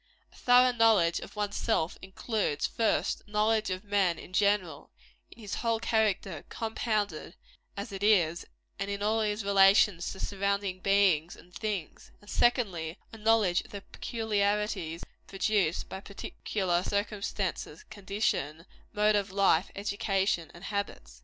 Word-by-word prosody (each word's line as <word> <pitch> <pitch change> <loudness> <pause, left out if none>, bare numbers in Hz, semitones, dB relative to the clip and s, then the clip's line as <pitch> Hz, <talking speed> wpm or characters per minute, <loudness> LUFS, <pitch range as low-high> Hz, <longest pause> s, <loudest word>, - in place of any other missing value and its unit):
A - - -20
thorough 250 +1 +5
knowledge 220 -8 +3
of - - -10
one's 205 -1 -2
self 180 -7 0
includes, 190 -4 -2
first, 225 -2 0
a - - -19
knowledge 215 +1 +1
of 185 0 -3
man 200 -4 +1
in 185 - -12
general, 190 -7 +1 0.4
in - - -16
his 210 -3 -7
whole 230 -1 +1
character 210 -8 0
compounded 220 -2 -2 0.4
as 200 +2 -5
it 195 0 -6
is 175 -6 +3 0.4
and 195 0 -3
in 200 0 -3
all 220 +2 +2
his 210 -1 -1
relations 195 -2 +4
to 190 - -9
surrounding 200 -1 -1
beings 185 -5 +2
and 180 - -18
things; 205 -7 -5
and, 205 - -13
secondly, 190 -9 +1 0.2
a - - -8
knowledge 215 -5 +3
of - - -17
the 200 - -7
peculiarities 205 -7 -2 0.2
produced 195 -4 0
by 190 - -6
particular 190 -2 -2
circumstances, 205 - -3
condition, 195 - -2 0.3
mode 210 0 +3
of 200 -2 0
life, 195 -3 +3
education 195 -4 -1
and 175 - -13
habits. 200 - -5
200 Hz, 140 wpm, -29 LUFS, 185-215 Hz, 0.4 s, thorough